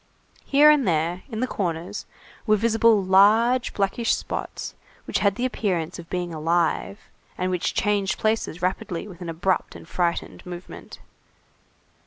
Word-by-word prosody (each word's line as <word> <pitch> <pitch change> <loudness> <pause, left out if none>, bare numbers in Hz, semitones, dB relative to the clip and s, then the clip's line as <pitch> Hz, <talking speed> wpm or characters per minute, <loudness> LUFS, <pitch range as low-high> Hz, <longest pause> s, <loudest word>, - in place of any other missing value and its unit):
Here 295 +2 +6
and 290 -6 +2
there, 170 +2 0
in 225 -2 -4
the - - +2
corners, 180 -1 -3 0.4
were 215 - +5
visible 225 -1 +3
large 220 +6 +4
blackish 200 +4 +1
spots - - -5 0.3
which - - -1
had 200 -2 +2
the 245 - -1
appearance 185 -9 -2
of 170 - -11
being 175 -2 -3
alive, 165 +5 0 0.4
and 185 0 -1
which 180 -2 -1
changed 205 -2 +1
places 215 -5 -1
rapidly 185 0 -2
with 185 -3 -12
an 175 - -5
abrupt 175 +3 -1
and - - -11
frightened 175 -1 -2
movement. 180 0 -9
190 Hz, 145 wpm, -24 LUFS, 175-220 Hz, 0.4 s, Here